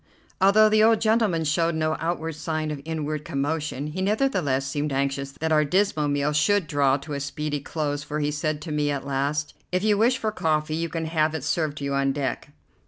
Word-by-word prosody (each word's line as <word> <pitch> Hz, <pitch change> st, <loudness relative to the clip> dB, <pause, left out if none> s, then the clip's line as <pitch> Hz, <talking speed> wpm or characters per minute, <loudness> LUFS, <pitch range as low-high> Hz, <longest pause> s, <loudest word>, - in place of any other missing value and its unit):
Although 210 Hz, +3 st, +6 dB
the 215 Hz, 0 st, +4 dB
old 225 Hz, 0 st, +5 dB
gentleman 215 Hz, -7 st, +2 dB
showed 165 Hz, +2 st, +1 dB
no 155 Hz, 0 st, 0 dB
outward 165 Hz, -1 st, -2 dB
sign 155 Hz, 0 st, -3 dB
of 145 Hz, -2 st, -5 dB
inward 155 Hz, -2 st, -3 dB
commotion, 145 Hz, 0 st, -2 dB
he 155 Hz, +5 st, -4 dB
nevertheless 190 Hz, -, +1 dB
seemed 145 Hz, +2 st, -2 dB
anxious 135 Hz, 0 st, -1 dB
that 160 Hz, +2 st, -3 dB
our 155 Hz, -1 st, +4 dB
dismal 155 Hz, -1 st, +1 dB
meal 145 Hz, +1 st, 0 dB
should 200 Hz, +5 st, +3 dB
draw 140 Hz, -2 st, +2 dB
to 145 Hz, +2 st, -8 dB
a 140 Hz, -, -2 dB
speedy 145 Hz, +1 st, -3 dB
close, 145 Hz, 0 st, -3 dB
for 150 Hz, +1 st, -4 dB
he 150 Hz, 0 st, 0 dB
said 150 Hz, 0 st, -2 dB
to 160 Hz, -, -6 dB
me 150 Hz, -1 st, 0 dB
at 140 Hz, -1 st, -2 dB
last: 140 Hz, +2 st, -1 dB, 0.2 s
"If 185 Hz, +1 st, 0 dB
you 210 Hz, -1 st, +3 dB
wish 245 Hz, +4 st, +3 dB
for 220 Hz, -3 st, -1 dB
coffee, 155 Hz, -5 st, 0 dB
you 165 Hz, +1 st, -2 dB
can 165 Hz, -1 st, -3 dB
have 160 Hz, -1 st, +1 dB
it 155 Hz, -, -4 dB
served 155 Hz, -1 st, -1 dB
to 145 Hz, -, -6 dB
you 140 Hz, 0 st, -1 dB
on 135 Hz, 0 st, +1 dB
deck." 140 Hz, 0 st, -3 dB
155 Hz, 215 wpm, -25 LUFS, 145-165 Hz, 0.2 s, Although